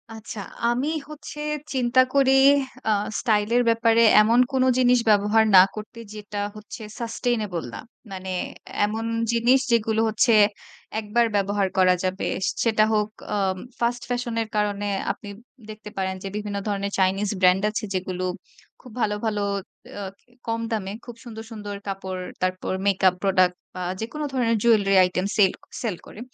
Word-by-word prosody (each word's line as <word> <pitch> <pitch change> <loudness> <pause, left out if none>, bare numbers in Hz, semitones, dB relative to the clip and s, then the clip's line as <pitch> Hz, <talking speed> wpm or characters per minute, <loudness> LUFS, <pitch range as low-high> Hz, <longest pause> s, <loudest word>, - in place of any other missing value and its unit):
আচ্ছা 220 -1 -8 0.3
আমি 250 +4 0 0.2
হচ্ছে 300 0 -9 0.3
চিন্তা 255 -1 +3
করি 275 -1 +4 0.6
আ - - +3 0.3
স্টাইল 210 -2 +1
এর 245 - +4
ব্যাপারে 230 0 +3 0.2
এমন 230 +3 +4
কোনো 260 -1 +2
জিনিস 250 -1 +4
ব্যবহার 210 +1 +4
না 185 - +11
করতে 215 +2 -8
যেটা 210 -1 -6 0.2
হচ্ছে 215 +2 -10 0.2
Sustainable 225 - -2
না। - - -6 0.3
মানে 190 0 -6 0.6
এমন 220 +2 -3 0.3
জিনিস 235 +3 +4
যেগুলো 220 -1 +2
হচ্ছে 220 +2 +3 0.7
১ 220 - -7
বার 235 -1 +5
ব্যবহার 200 0 +1
করা 185 -1 +5
যাবে। 185 +1 -2 0.4
সেটা 220 -2 +3
হোক 210 -1 +2 0.3
আ - - +1 0.4
ফাস্ট 240 +1 0
ফ্যাশন 245 -1 -2
এর 225 - -3
কারণে 205 -1 0 0.3
আপনি 205 - -9 0.4
দেখতে 215 0 -9
পারেন 190 -1 -1
যে - - -4
বিভিন্ন 210 -1 -3
ধরনের 200 -1 -2
চাইনিজ 195 +2 +1
ব্র্যান্ড 185 +1 +4
আছে 215 - -4
যেগুলো 185 0 -3 0.6
খুব 250 - -13
ভালো, 210 -2 +1
ভালো 210 -2 -1 0.6
আ - - -5 0.5
কম 230 0 -1
দামে 200 -4 -2
খুব 240 -1 -9
সুন্দর 225 -3 -8
সুন্দর 205 -2 -6
কাপড়, 190 -1 -4 0.2
তারপর 185 0 -1
মেকআপ 190 -2 +4
প্রোডাক্ট 185 -2 +3 0.2
বা 185 - -5 0.2
যেকোনো 300 +7 -4
ধরনের 235 -3 +1
জুয়েলারি 210 -4 +4
আইটেম 180 +1 0
সেল 195 -3 +5 0.3
সেল 225 -6 -2
করে। - - -12
215 Hz, 155 wpm, -24 LUFS, 195-230 Hz, 0.7 s, না